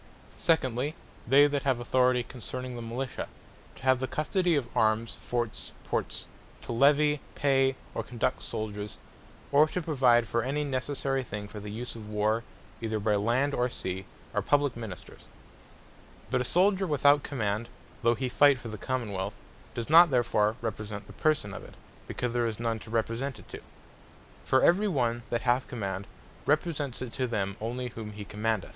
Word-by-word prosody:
Secondly, 140 -2 +1 0.3
they 140 +4 +7
that 145 -1 +1
have 130 -3 +1
Authority 125 0 +3
concerning 125 +1 -6
the 120 - -5
Militia; 125 +3 -4 0.5
to - - -15
have 130 -1 +4
the 130 - -1
custody 175 +4 +1
of 135 -5 0
Armes, 110 +1 +2
Forts, 120 -2 -3
Ports; - - -2 0.4
to - - -6
Levy, 145 +4 +4
Pay, 135 -2 +3 0.2
or - - -2
Conduct 125 +1 -1
Souldiers; 105 -2 -4 0.5
or 145 +2 +6
to 180 - -2
provide 130 -8 +3
for 115 - +1
any 140 +5 -1
necessary 135 0 -1
thing 105 -4 -6
for 105 - -8
the 105 0 -7
use 115 +4 -5
of 110 -2 -9
war, 105 +2 +1 0.4
either 110 -1 -1
by 105 +1 +1
Land 120 +7 +1
or 125 -1 +1
Sea, 95 -4 -4 0.3
are - - +1
publique 145 -3 +2
Ministers. 110 -6 -8 1.1
But - - +2
a - - -1
Souldier 190 +5 +3
without 145 -1 +5
Command, 115 -5 -2 0.3
though 120 0 +4
he 130 +2 -2
fight 140 +2 +5
for 120 - -8
the 110 -1 -7
Common 130 -5 -2
wealth, 95 +2 -3 0.4
does 115 - -3
not 170 +2 +8
therefore 115 -4 +2
represent 105 -2 -4
the - - -12
Person 150 -10 +1
of - - -7
it; - - -13 0.3
because 125 -1 -2
there 120 -1 +2
is 110 -1 -4
none 115 -1 -1
to - - -12
represent 115 +3 -1
it - - -14
to. - - -7 0.9
For 130 - +3
every 200 +5 +5
one 120 - +1
that 120 - 0
hath 125 +1 +2
command, 100 -4 -4 0.4
represents 145 -4 0
it 120 - -7
to 130 - -1
them 100 -4 -1
only 125 +3 -3
whom 110 -2 -7
he 105 0 -7
commandeth. 110 -1 -1
120 Hz, 175 wpm, -29 LUFS, 110-140 Hz, 1.1 s, not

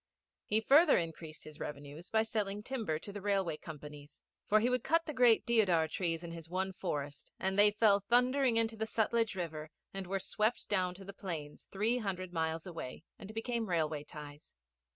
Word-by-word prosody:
He 215 +1 +3
further 290 +7 +6
increased 160 -2 -5
his 155 -1 -11
revenues 145 +3 -7
by 220 0 +3
selling 210 -2 -2
timber 225 -11 -2
to 200 +5 -9
the 205 - -6
Railway 195 -5 +1
companies; 150 -2 -10 0.3
for 215 - +6
he 230 - +2
would 250 -1 +1
cut 330 +1 +2
the 305 - -4
great 245 -4 +5
deodar 195 -9 +3
trees 165 -1 -2
in 170 - -6
his 165 -1 -9
one 190 +2 -1
forest, 145 -6 -4
and 190 0 0
they 205 +1 +7
fell 205 -1 +4
thundering 250 +3 +3
into 225 0 +1
the 220 0 -2
Sutlej 225 -1 +1
river 155 -4 -4 0.2
and 195 -1 -5
were 195 +1 -1
swept 215 +5 -1
down 185 -3 0
to 195 +1 -11
the 200 - -8
plains 160 -7 -6
three 220 +5 +1
hundred 185 -4 -4
miles 160 -1 -1
away 165 -6 -7 0.2
and 200 - -8
became 225 -1 -2
railway 155 -3 0
ties. 150 0 -11
190 Hz, 190 wpm, -33 LUFS, 160-220 Hz, 0.3 s, they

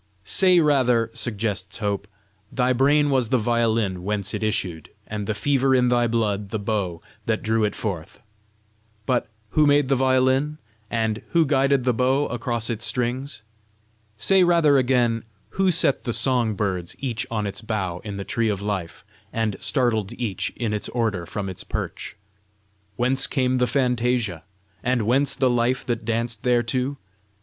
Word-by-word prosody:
"Say 185 - +5
rather," 125 -7 +2
suggests 105 -3 -2
Hope, 100 -2 -2 0.4
"thy 125 -1 +1
brain 145 +3 +3
was 130 -4 +1
the 130 - +3
violin 110 -5 0
whence 100 0 -1
it - - -3
issued, 95 -7 -2 0.2
and 105 -2 -5
the 110 - -1
fever 135 +3 +2
in 125 -1 +3
thy 120 -1 +2
blood 105 -3 -1
the 110 - -2
bow 100 -5 -3 0.2
that 110 -1 0
drew 110 0 +1
it 105 -1 0
forth. 85 -7 -5 0.9
But 125 -1 0 0.2
who 150 +4 +3
made 145 -2 +3
the 135 - +4
violin? 130 +3 +2 0.3
and 110 -1 -1
who 165 -2 +4
guided 135 -2 +2
the 125 0 +2
bow 130 +4 +2
across 120 -1 -2
its 115 -1 -3
strings? 125 +1 -2 0.7
Say 190 - +5
rather, 170 -4 +4
again 120 -3 +1 0.3
who 190 - +1
set 170 -6 +2
the 120 - -2
song 120 -5 +1
birds 95 -4 -2
each 125 -2 -3
on 110 -2 -2
its 100 - -5
bough 95 -6 -3
in 100 -2 -6
the 100 - -5
tree 115 -1 0
of 100 -2 -1
life, 100 -4 -4 0.3
and 110 -3 -1
startled 115 -6 +1
each 115 -6 -3
in 115 -3 -2
its 105 - -3
order 110 -8 -1
from 100 +3 -4
its 95 -2 -6
perch? - - -5 0.8
Whence 130 +4 +2
came 130 -2 0
the 125 - +2
fantasia? 120 - 0 0.4
and 125 0 0
whence 135 +5 +2
the 130 - +2
life 120 +1 +1
that 120 -2 -3
danced 115 -1 -1
thereto? 125 +3 0
120 Hz, 160 wpm, -23 LUFS, 105-130 Hz, 0.9 s, Say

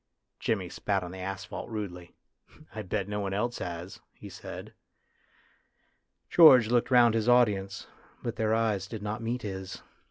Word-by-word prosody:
Jimmy 100 -5 -1
spat 100 0 -1
on 90 - -7
the 95 - -9
asphalt 95 +4 -6
rudely. 95 -6 -6 0.3
" 155 - -22
I 110 - -5
bet 100 0 -3
no 105 0 -3
one 100 -1 -2
else 120 +4 -2
has," 85 +1 -6 0.2
he - - -11
said. - - -9 1.5
George 130 -10 +7
looked 120 0 +2
round 120 -3 +6
his 115 +1 +1
audience, 105 -5 +2 0.4
but 120 -2 -3
their 110 0 +1
eyes 105 -4 0
did 105 0 -7
not 105 +3 -3
meet 120 +2 -3
his. 95 -2 -6
105 Hz, 160 wpm, -29 LUFS, 95-115 Hz, 1.5 s, George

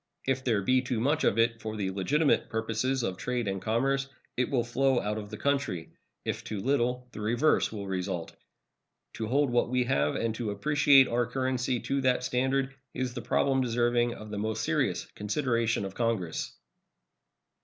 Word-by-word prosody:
If 130 0 0
there 110 -6 +1
be 130 +5 +3
too 125 -2 -2
much 145 +6 +1
of 100 - +2
it 115 0 +2
for 110 0 -4
the 95 -2 -1
legitimate 140 - +1
purposes 115 +4 -1
of 95 -4 -2
trade 125 -1 -2
and 95 -1 -2
commerce, 135 +5 0 0.3
it 125 - 0
will 125 -4 +1
flow 130 +2 +2
out 105 +1 -2
of 105 -1 -8
the - - -7
country. 140 -12 -1 0.3
If - - -3
too 105 - -4
little, 125 +1 0
the 105 - -8
reverse 120 +8 +2
will 105 -2 -5
result. 95 -3 -3 0.8
To 110 - -4
hold 140 +2 +2
what 120 0 +2
we 125 0 +2
have 75 -10 +1
and 115 -1 -1
to 115 -1 -3
appreciate 140 +5 +5
our 120 0 0
currency 130 -1 -1
to 140 0 -1
that 125 -1 +2
standard 130 +2 0 0.2
is 130 -1 -2
the 120 - -5
problem 135 +3 +2
deserving 120 0 +1
of 110 0 -10
the 105 - -3
most 110 +1 -2
serious 80 - 0
consideration 115 -1 0
of 95 - -6
Congress. 110 -9 -2
120 Hz, 180 wpm, -29 LUFS, 110-130 Hz, 0.8 s, appreciate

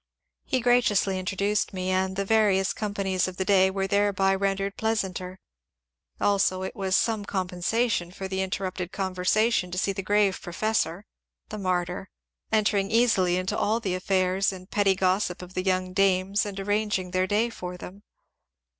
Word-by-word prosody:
He 260 - 0
graciously 230 -6 +2
introduced 200 +3 -1
me, 185 0 -2
and 190 0 0
the 195 +1 -1
various 200 -3 +3
companies 195 -3 -1
of 185 -1 -7
the 190 - -1
day 190 -1 +4
were 195 0 -2
thereby 195 -1 +2
rendered 195 +1 -1
plea 220 0 0
santer; 185 -3 -4 0.8
also 195 -2 +2
it 190 - -5
was 190 -3 0
some 220 -1 +1
compensation 190 +1 -1
for 190 +2 -6
the 190 0 -2
interrupted 185 -1 -3
con 190 -1 -3
versation 185 +1 +1
to 180 - -4
see 195 +1 0
the 195 - -4
grave 205 0 +1
professor 195 0 -1 0.4
(the 215 - -6
martyr 185 0 -2 0.2
!) - - -47
entering 205 -2 +2
easily 215 -6 +3
into 185 +1 -2
all 220 +3 +1
the 195 -5 -2
affairs 185 +1 +1
and 185 -1 -11
pretty 200 -2 +3
gossip 185 -1 0
of 180 0 -11
the 185 - -1
young 185 -1 0
dames 195 +1 +2
and 200 -1 -6
arranging 205 -2 -1
their 185 0 +1
day 220 +4 +1
for 180 -4 -7
them. 190 +3 -10
195 Hz, 170 wpm, -26 LUFS, 185-205 Hz, 0.8 s, day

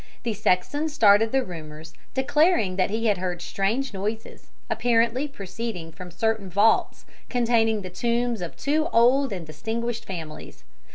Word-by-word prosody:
The 230 -2 -1
sexton 285 +12 0
started 220 -6 +4
the 270 0 +2
rumours, 160 -3 -9 0.2
declaring 270 - +2
that 185 +1 +1
he 225 +3 -2
had 205 -4 +2
heard 180 -1 -3
strange 210 +9 -1
noises, 210 +3 -5 0.2
apparently 240 +3 +1
proceeding 200 - -6
from 180 +3 -10
certain 215 +2 -1
vaults 205 +5 +2 0.2
containing 230 -3 +2
the 185 - -7
tombs 235 +1 -1
of 175 - -6
two 305 +3 +1
old 250 +3 +4
and 180 -4 -5
distinguished 225 +9 -4
families. 165 -5 -8
220 Hz, 145 wpm, -25 LUFS, 185-240 Hz, 0.2 s, started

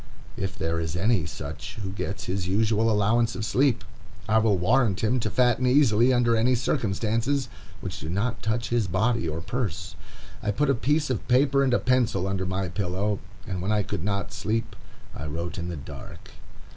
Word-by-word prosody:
If 95 -2 -4
there 80 0 -1
is 80 0 -3
any 95 -1 +2
such 80 +3 -7
who 100 -4 -5
gets 100 0 -4
his 90 -1 -2
usual 110 +3 +2
allowance 110 +1 +2
of 110 - -3
sleep, 130 +3 +2 0.4
I 110 +1 +4
will 110 -3 +3
warrant 110 +2 +2
him 120 +4 +2
to 110 - -1
fatten 125 +1 +2
easily 125 -3 +5
under 120 -2 +3
any 120 +3 +3
circumstances 115 +4 0 0.3
which - - -5
do 80 - -6
not 105 +7 -1
touch 110 +3 -1
his 120 -4 +1
body 110 +1 +1
or 80 +2 -4
purse. 90 - -3 0.5
I 105 - -2
put 140 +8 +2
a - - +3
piece 145 +4 +1
of 125 - -3
paper 140 +2 +4
and 135 - +2
a 125 - +4
pencil 120 -7 +1
under 95 -1 -1
my 95 +1 -1
pillow, 100 +3 -1 0.3
and 95 -2 -4
when 95 +3 -1
I 105 -1 +2
could 100 -4 -4
not 100 -4 -2
sleep, 110 +5 -2 0.4
I 75 - -5
wrote 85 +4 -4
in 85 0 -4
the 85 - -4
dark. 70 - -10
105 Hz, 190 wpm, -26 LUFS, 95-120 Hz, 0.5 s, easily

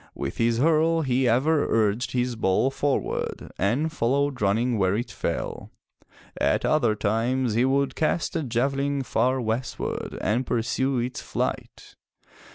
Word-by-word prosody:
With - - -4
his 115 0 +2
hurle 160 +3 +3
he 130 0 +2
ever 145 +6 +2
urged 115 +4 +1
his 125 -1 0
ball 110 +5 +1
forward 140 0 -2
and 125 - +1
followed 140 0 0
running 110 +4 +1
where 95 0 +2
it 120 +3 -3
fell. - - -4 0.7
At - - +1
other 120 -8 +2
times 115 +3 0
he 120 +3 +3
would 140 +1 +1
cast 160 +2 -1
a 165 - +1
javelin 135 +2 0
far 130 +2 +1
westward 115 +1 -3
and 110 +6 0
pursue 125 +3 0
its 125 +1 -3
flight. - - -4
125 Hz, 140 wpm, -25 LUFS, 115-140 Hz, 0.7 s, hurle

